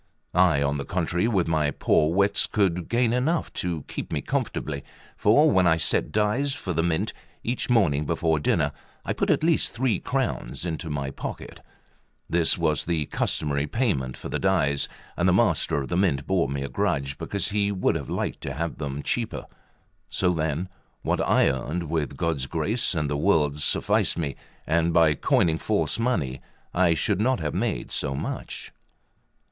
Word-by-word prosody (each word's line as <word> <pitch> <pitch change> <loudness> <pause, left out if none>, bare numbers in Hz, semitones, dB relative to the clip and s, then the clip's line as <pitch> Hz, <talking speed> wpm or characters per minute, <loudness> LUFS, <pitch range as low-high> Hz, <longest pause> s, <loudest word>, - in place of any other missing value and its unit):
I, 85 -5 +4
on 70 0 0
the - - -2
contrary, 90 +5 0
with 95 -8 +1
my 80 -2 +2
poor 75 +2 +2
wits 100 +3 +3
could 90 -5 0
gain 120 0 +2
enough 150 +7 0
to 85 -5 -3
keep - - -6
me - - -1
comfortably; 70 -3 -2 0.3
for 145 +9 +5
when 95 -2 +4
I 80 -1 +4
set 80 - +1
dies 115 +7 +1
for 95 -10 -4
the 80 - +1
Mint, 80 -1 0 0.3
each 120 +2 -2
morning 75 - +3
before 80 -2 +1
dinner 75 - +1 0.3
I - - 0
put - - -1
at - - +2
least 165 -1 +2
three 115 -4 +1
crowns 130 -8 -2
into 80 -1 -4
my 70 -2 -3
pocket; - - -7 0.7
this 85 -1 +3
was 75 -3 +1
the 80 -3 0
customary 70 0 -1
payment 70 - -1
for - - -7
the - - -2
dies, 80 -8 +1 0.3
and - - +2
the - - +4
Master - - +2
of 70 - -6
the 85 - 0
Mint 90 -8 +1
bore 90 -7 +1
me 70 0 -2
a - - -3
grudge, 70 0 -1
because 100 -1 -2
he 100 -1 +1
would 95 -2 +1
have - - -4
liked - - -3
to 65 - -4
have 85 +3 -3
them 70 -1 -4
cheaper; 120 -2 -2 0.6
so 90 -1 +1
then, 80 +2 -1 0.4
what - - 0
I - - +4
earned 75 +5 -2
with 80 -5 -1
God's 80 -6 -1
grace 95 - 0
and 75 -2 0
the 70 - -1
world's, 75 -4 +2
sufficed - - +1
me, 75 -6 -2 0.3
and 85 +1 +2
by 80 -3 +5
coining 80 +3 +2
false - - 0
money 75 - -1 0.3
I 85 -2 +3
should 100 +6 0
not 130 +1 +2
have 75 -2 -2
made - - -2
so 70 -2 -1
much. - - -5
85 Hz, 180 wpm, -25 LUFS, 75-100 Hz, 0.7 s, for